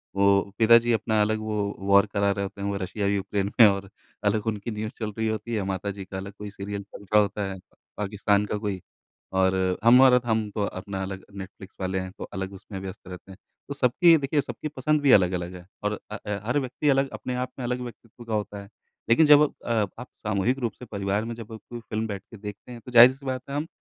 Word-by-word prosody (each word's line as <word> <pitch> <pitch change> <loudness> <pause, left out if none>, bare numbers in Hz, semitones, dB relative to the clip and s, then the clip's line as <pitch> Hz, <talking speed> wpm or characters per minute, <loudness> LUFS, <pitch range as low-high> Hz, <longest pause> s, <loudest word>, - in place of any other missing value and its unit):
वो 100 0 +3
पिता 115 +1 +8
जी 120 +1 -1
अपना 110 -1 +1
अलग 110 +1 +1
वो 105 -2 -2
वॉर 100 +1 +5
करा 100 0 +2
रहे 100 0 -2
होते 100 0 -7
हैं, 100 - -2
वो 100 - -2
रशिया 100 +2 -2
यूक्रेन 100 0 -1
में 115 - +10
और 100 -1 -1 0.4
अलग 105 +1 +1
उनकी 110 +1 -2
न्यूज़ 110 +1 -4
चल 110 -2 -3
रही 110 0 0
होती 110 +2 -3
है, 105 - -1
माता 95 +1 -3
जी 100 -1 -8
का 95 - -7
अलग 100 +1 -7
कोई 105 0 -7
सीरियल 100 0 -6
चल 100 0 -13
रहा 105 +2 +4
होता 100 0 -2
है 95 - -6
प - - -27 0.2
पाकिस्तान 105 0 +1
का 105 - -2
कोई 100 -3 -3 0.6
और 95 0 +3 0.3
हम 120 +3 +7
और 130 -1 +7
हम 110 -2 0
तो 105 - 0
अपना 95 0 -5
अलग 95 0 -6
नेटफ्लिक्स 95 0 -10
वाले 95 0 -1
हैं 95 0 -5
तो - - -6
अलग 95 -1 -4
उसमें 95 0 -8
व्यस्त 95 -1 -9
रहते 90 +1 -10
हैं। 95 - -12 0.3
तो 140 - -4
सबकी 140 +6 +5
देखिए 145 +1 0
सबकी 150 +3 -6
पसंद 150 +1 0
भी 140 -2 +4
अलग-अलग 90 -3 +3
है 90 -1 -11 0.2
और 105 0 -1
अ, 105 - -4
ऐ 105 - -1
हर 125 +6 +1
व्यक्ति 130 +2 -1
अलग 135 0 +3
अपने 125 - -4
आप 125 0 -2
में 125 - -4
अलग 125 +1 -2
व्यक्तित्व 120 -1 -10
का 115 - -4
होता 105 -1 -2
है। 100 - -13 0.4
लेकिन 135 +8 +6
जब 150 0 +8 0.2
अ, - - -2 0.3
आप 125 - -7
सामूहिक 110 +5 0
रूप 120 -5 -2
से 125 - -11
परिवार 100 +1 -1
में 115 - -4
जब 115 -1 -9
आप 110 - -8
कोई 120 - -6
फ़िल्म 110 -1 -3
बैठ 100 -2 -5
के 115 - -10
देखते 105 +3 -9
हैं 120 - -8
तो 125 - -9
ज़ाहिर-सी 130 +3 +7
बात 130 -1 -2
है 140 - -4
हम 150 +2 -2
105 Hz, 245 wpm, -26 LUFS, 100-120 Hz, 0.6 s, में